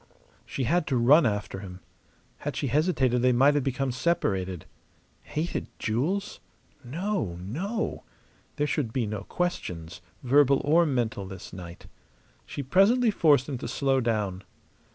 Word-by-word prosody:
She 135 - -3
had 170 +6 +1
to 135 - +1
run 135 +5 +6
after 105 -2 -3
him. 90 -2 -9 0.6
Had - - -4
she - - -2
hesitated 140 -6 +2
they 125 0 +4
might 135 +4 +5
have 145 -2 +1
become 135 0 -1
separated. 95 - -1 0.6
Hated 160 +3 -3
jewels? 155 - -1 0.4
No, 150 - -2
no! 180 - -3 0.5
There 145 - 0
should 145 -6 -1
be 120 -1 0
no 105 -1 -5
questions, 90 - -4 0.2
verbal 140 +1 +4
or 165 +3 +4
mental, 115 -7 -1
this 95 -1 -10
night. 90 -2 -9 0.6
She 140 - -5
presently 215 - +4
forced 145 -9 +4
him 135 -4 -4
to - - -5
slow 135 -1 +1
down. 105 -6 -1
130 Hz, 140 wpm, -27 LUFS, 105-155 Hz, 0.6 s, run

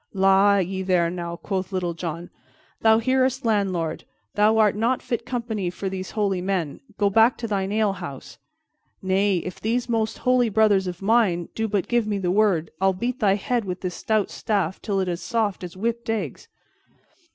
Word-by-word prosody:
"La, 195 +1 +5
ye 190 0 -1
there 180 -3 +2
now!" 170 -1 -5
quoth 190 +1 -4
Little 180 -2 -1
John. 170 0 -6 0.5
"Thou 220 0 +5
hearest, 260 +2 +1
landlord; 190 -7 0 0.3
thou 215 +2 +3
art 210 -2 +4
not 235 +4 +1
fit 240 0 -4
company 230 -7 -2
for 190 +2 -4
these 185 -1 -5
holy 200 -4 -1
men; 180 -6 -2 0.2
go 205 - +2
back 225 +4 +4
to 230 - -4
thine 195 -2 -1
alehouse. 195 -10 -3 0.6
Nay, 190 +1 +2
if 185 - -7
these 235 +3 0
most 225 -2 -1
holy 250 -2 +2
brothers 205 -3 +3
of 180 +1 -6
mine 195 -6 +2
do 225 0 -1
but 200 -3 -1
give 240 -3 +1
me 205 -1 -1
the 180 -2 -1
word, 190 -5 +2
I'll 190 0 +3
beat 240 +7 -3
thy 195 -3 +3
head 235 +3 -1
with 180 -2 -5
this 180 -1 -3
stout 215 +2 0
staff 195 -6 -1
till 200 -2 -1
it 190 - 0
is 175 -1 -2
as - - -12
soft 215 -6 -1
as 180 0 -8
whipped 230 +3 -2
eggs." 225 -1 -3
200 Hz, 185 wpm, -24 LUFS, 185-225 Hz, 0.6 s, La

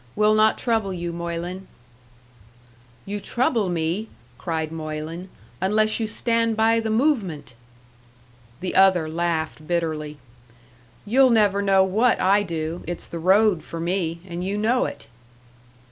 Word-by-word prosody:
We'll 210 +1 +4
not 215 0 +4
trouble 225 -5 0
you, 175 -2 -4
Moylan." 170 +2 -5 1.4
"You 205 +1 -4
trouble 230 -2 0
me," 175 +5 -2 0.3
cried 160 +2 -3
Moylan, 160 +3 -6 0.3
"unless 215 +3 +2
you 225 - -1
stand 230 0 0
by 225 +1 +3
the 225 -1 -2
movement!" 215 - 0 1.1
The 185 - -3
other 190 -4 +4
laughed 160 -1 -2
bitterly. 155 -3 -2 0.9
"You'll 260 +5 +4
never 205 -4 +3
know 195 -1 +4
what 220 +6 +2
I 200 +2 +4
do. 165 -3 -4
It's 175 0 -3
the 170 - -6
road 190 0 +3
for 165 - -7
me 170 -1 -2
and 175 0 -5
you 195 +2 -2
know 235 +4 +2
it!" - - -7
190 Hz, 130 wpm, -23 LUFS, 165-215 Hz, 1.4 s, We'll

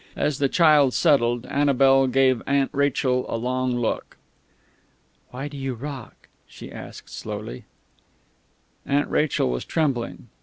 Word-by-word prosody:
As 145 -1 -1
the 140 -1 +2
child 150 -6 +4
settled, 120 -7 +2
Annabel 135 -1 +3
gave 130 -1 +3
Aunt 140 -1 +1
Rachel 135 -2 +1
a - - -2
long 125 +1 -1
look. 120 -2 -3 1.1
"Why 135 +3 -6
do 145 -1 -9
you 135 -2 -3
rock?" 135 0 -9 0.2
she - - -11
asked - - -10
slowly. - - -7 1.2
Aunt 140 +1 0
Rachel 145 - +1
was 60 - -3
trembling. 135 -8 -2
135 Hz, 125 wpm, -24 LUFS, 125-145 Hz, 1.2 s, child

